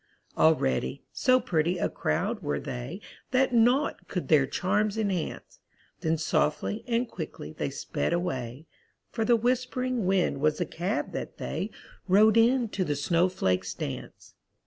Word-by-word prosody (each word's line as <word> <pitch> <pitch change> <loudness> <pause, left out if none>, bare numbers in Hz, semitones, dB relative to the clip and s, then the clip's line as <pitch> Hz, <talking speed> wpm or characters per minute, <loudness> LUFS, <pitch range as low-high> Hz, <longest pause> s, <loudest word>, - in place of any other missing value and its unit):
All 160 0 +5
ready, 65 - -1
so 255 0 +3
pretty 175 -6 0
a - - +1
crowd 75 - -1
were 70 -1 -1
they 130 - -6 0.3
That 260 -1 +2
naught 245 +5 +2
could 180 - -4
their 145 -4 +5
charms 205 +6 0
enhance; 195 -6 -3 0.4
Then 160 0 0
softly 160 +6 0
and 240 +1 +1
quickly - - -7
they - - -2
sped - - -3
away, 135 -6 -3 0.5
For 225 - -1
the 235 +1 +4
whisp'ring 250 -1 0
wind 185 -7 +2
was 155 0 +2
the 175 - -1
cab 175 +6 -2
that - - -6
they - - -3 0.4
Rode 210 +3 +5
in 235 +1 +4
to 195 - -1
the 150 -4 -1
snowflakes' 145 - +1
dance. - - -7
185 Hz, 145 wpm, -28 LUFS, 155-230 Hz, 0.5 s, All